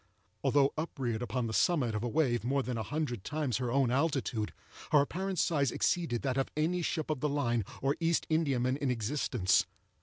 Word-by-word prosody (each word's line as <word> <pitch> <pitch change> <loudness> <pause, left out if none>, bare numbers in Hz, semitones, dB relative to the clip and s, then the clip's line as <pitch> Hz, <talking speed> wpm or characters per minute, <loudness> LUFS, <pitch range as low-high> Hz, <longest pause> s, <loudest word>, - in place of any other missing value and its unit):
Although 140 -1 +3
upreared 125 -8 -2
upon 120 +1 -2
the 110 - -3
summit 135 -5 +2
of 105 +1 -2
a 120 - -1
wave 120 -4 +1
more 135 +3 +1
than 125 -1 -3
a 115 - -2
hundred 125 -3 -3
times 150 -6 -1
her 125 -2 -2
own 135 -2 +2
altitude, 130 - 0 0.4
her 150 - +6
apparent 185 +6 -2
size 145 -6 +2
exceeded 165 -10 0
that 135 -1 0
of 135 - 0
any 170 +4 +1
ship 160 -2 -1
of 150 - -2
the 150 - 0
line 120 -6 0 0.2
or 140 +1 +2
East 165 0 +1
Indiaman 135 -5 +1
in 140 -2 -1
existence. 115 -4 +1
135 Hz, 190 wpm, -31 LUFS, 120-155 Hz, 0.4 s, her